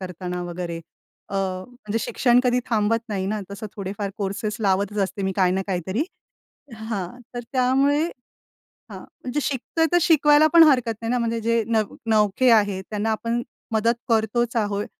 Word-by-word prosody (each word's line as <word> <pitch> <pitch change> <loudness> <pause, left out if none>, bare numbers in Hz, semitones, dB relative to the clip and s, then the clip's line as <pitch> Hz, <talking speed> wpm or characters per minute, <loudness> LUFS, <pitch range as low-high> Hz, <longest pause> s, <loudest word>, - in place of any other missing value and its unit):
करताना 180 -1 -5
वगैरे. 175 -1 -5 0.5
अ, - - -7
म्हणजे 200 +4 -3
शिक्षण 245 +1 +3
कधी 250 0 +2
थांबत 225 +1 +1
नाही 195 -3 -2
ना, 210 +2 -2
तसं 200 +2 -6
थोडेफार 200 0 -4
कोर्सेस 205 +1 -3
लावतच 200 0 0
असते 195 +1 -6
मी 190 0 0
काही 185 -2 +3
ना 190 +1 0
काहीतरी 190 - -1 0.7
हां, 220 -1 -5 0.2
तर - - -2
त्यामुळे 270 +4 +3 0.7
हां, - - -13
म्हणजे 255 +4 -5
शिकतोय 295 +4 0
तर 350 - +6
शिकवायला 305 -2 +5
पण 335 - +10
हरकत 250 -6 +3
नाही 225 - -2
ना, 250 - +1
म्हणजे 230 -1 -1
जे 230 +1 +1
नव 220 -3 0
नवखे 215 +3 +3
आहेत 205 -4 +3
त्यांना 215 +1 -1
आपण 230 +2 -1 0.3
मदत 225 +2 +2
करतोच 230 +1 +1
आहोत. 205 -2 0
220 Hz, 160 wpm, -23 LUFS, 195-240 Hz, 0.7 s, पण